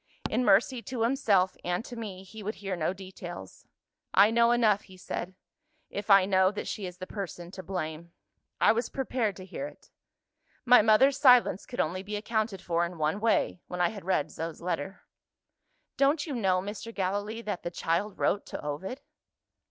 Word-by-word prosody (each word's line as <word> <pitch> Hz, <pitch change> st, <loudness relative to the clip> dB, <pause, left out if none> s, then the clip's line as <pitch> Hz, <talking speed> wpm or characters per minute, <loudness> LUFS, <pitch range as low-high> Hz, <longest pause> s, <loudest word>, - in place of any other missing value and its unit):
In 235 Hz, +3 st, +1 dB
mercy 230 Hz, +4 st, +3 dB
to 230 Hz, +1 st, -3 dB
himself 205 Hz, -7 st, +2 dB
and 180 Hz, +6 st, -2 dB
to 245 Hz, -, -8 dB
me, 200 Hz, -5 st, -6 dB
he 215 Hz, +3 st, -11 dB
would 210 Hz, +2 st, -4 dB
hear 195 Hz, -2 st, -4 dB
no 170 Hz, 0 st, 0 dB
details. 185 Hz, -, -9 dB, 0.5 s
'I 200 Hz, +3 st, +7 dB
know 235 Hz, 0 st, +4 dB
enough,' 220 Hz, -4 st, +3 dB
he 185 Hz, -, -13 dB
said, 185 Hz, 0 st, -5 dB, 0.6 s
'if 205 Hz, +1 st, -5 dB
I 195 Hz, -2 st, +7 dB
know 190 Hz, -1 st, +4 dB
that 210 Hz, -, -5 dB
she 200 Hz, -3 st, -4 dB
is 180 Hz, 0 st, -9 dB
the 185 Hz, -, -6 dB
person 180 Hz, -3 st, -6 dB
to 190 Hz, -, -7 dB
blame. 170 Hz, -2 st, -5 dB, 0.5 s
I -, -, +6 dB
was 235 Hz, +2 st, -1 dB
prepared 250 Hz, -6 st, -1 dB
to 185 Hz, -, -10 dB
hear 275 Hz, +9 st, -5 dB
it. -, -, -16 dB, 0.7 s
My 245 Hz, -1 st, +8 dB
mother's 225 Hz, +6 st, +4 dB
silence 250 Hz, -7 st, +5 dB
could 245 Hz, -, -7 dB
only 180 Hz, +4 st, 0 dB
be 205 Hz, +2 st, -5 dB
accounted 215 Hz, -2 st, -2 dB
for 170 Hz, 0 st, +1 dB
in 170 Hz, 0 st, -4 dB
one 155 Hz, +5 st, 0 dB
way, 220 Hz, -4 st, +1 dB
when 180 Hz, -, -6 dB
I 175 Hz, -1 st, +3 dB
had 205 Hz, -3 st, -8 dB
read 170 Hz, -4 st, 0 dB
Zo's 165 Hz, 0 st, -5 dB
letter.' 175 Hz, +1 st, -4 dB, 1.0 s
Don't 285 Hz, +2 st, +3 dB
you 300 Hz, -, -4 dB
know, 190 Hz, -6 st, +1 dB
Mr. 205 Hz, +3 st, -6 dB
Gallilee, 205 Hz, +3 st, -2 dB
that 205 Hz, -5 st, -3 dB
the -, -, -3 dB
child 175 Hz, +4 st, -1 dB
wrote 205 Hz, -, 0 dB
to -, -, -6 dB
Ovid?" 190 Hz, -, -4 dB
195 Hz, 185 wpm, -29 LUFS, 180-225 Hz, 1.0 s, My